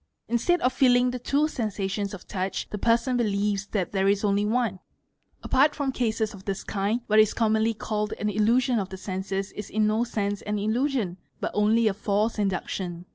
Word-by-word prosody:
Instead 245 +10 +1
of 255 +1 +2
feeling 250 -2 +4
e 250 - -3
two 285 +5 +1
sensations 200 -6 -2
of 190 - -14
touch 190 0 -3
the 210 - -4
person 235 +4 +2
believes 205 -3 0
that 195 -5 -2
there 195 -1 +1
is 200 +1 +2
only 200 0 +2
one. 220 -3 0 0.7
part 285 +3 +5
aia 275 -2 0
cases 220 -3 -1
of 190 -2 -12
this 195 -1 -3
kind, 205 +4 -1
what 215 0 +4
is 215 -1 +4
commonly 220 0 +2
called 210 0 -2
an 210 - -3
"illusion 230 +4 +2
of 195 - -2
'senses'? 190 +1 -4
is 210 - -7
in 215 0 +1
no 215 +2 +2
sense 205 -4 -2
an 210 0 -2
illusion 220 -2 0 0.2
but - - -2
only 220 +2 +3
a 210 - +2
false 210 +2 0
induction. 180 -3 -2
210 Hz, 185 wpm, -26 LUFS, 200-235 Hz, 0.7 s, part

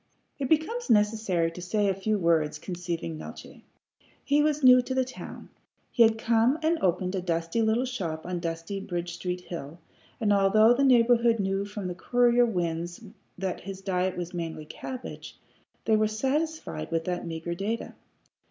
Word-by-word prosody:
It 270 - -2
becomes 325 +11 0
necessary 210 -6 +2
to 180 - -9
say 205 +3 0
a 195 - +2
few 210 +3 -1
words 160 -4 +1
concerning 170 - -5
Neeltje. 80 0 -10 0.6
He 290 +1 +3
was 300 -1 +1
new 250 0 +8
to 260 +1 -4
the 260 -1 +2
town. 255 - -9 0.4
He 240 - +1
had 225 -1 +6
come 230 +5 +2
and 325 +1 +2
opened 185 0 +1
a 190 - -1
dusty 165 +4 -1
little 225 +3 +2
shop 170 -11 -4
on 180 0 -3
dusty 165 +3 -4
Bridge 175 -3 -4
Street 180 +1 -4
hill, 165 -3 -7 0.4
and 210 -3 +2
although 210 +4 +5
the 270 +3 +1
neighborhood 235 -2 +5
knew 195 0 0
from 205 -2 -5
the 180 - -3
courier 245 +5 +3
winds 175 -4 -2 0.4
that 185 0 -3
his 195 0 -7
diet 185 -1 -1
was 175 0 -5
mainly 165 -3 -5
cabbage, 255 +10 -8 0.5
they 220 - +4
were 215 0 +3
satisfied 295 +9 -2
with 165 -1 -1
that 180 -1 -3
meagre 165 +1 -4
data. 210 +6 -3
195 Hz, 170 wpm, -27 LUFS, 175-235 Hz, 0.6 s, new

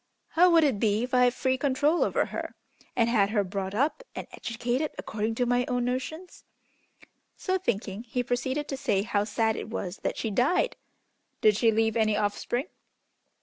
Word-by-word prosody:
How 355 +2 +5
would 335 -2 +6
it 265 -9 +2
be 215 +1 +2
if 250 - -5
I 250 0 +6
had 245 - +3
free 260 -1 0
control 290 +4 +2
over - - +1
her, - - -6 0.4
and 230 -1 +3
had 210 -4 +3
her 210 -2 +1
brought 190 +1 -4
up 285 - +1
and - - -5
educated 245 +5 -2
according 220 +1 -3
to 245 - +1
my 245 +1 +2
own 245 -1 0
notions?" 315 +8 -4 0.9
So 375 0 -1
thinking, 215 - -2
he 245 +1 -2
proceeded 260 +4 -1
to 275 - -3
say 205 -8 +1
how 205 -2 0
sad 220 +1 +1
it - - -6
was 190 -4 -4
that - - -3
she 225 - -2
died! 270 - +2 0.7
"Did 215 -1 +5
she 225 +2 +3
leave 225 +1 +1
any 215 -2 +2
offspring?" 210 +5 -1
240 Hz, 185 wpm, -27 LUFS, 215-265 Hz, 0.9 s, would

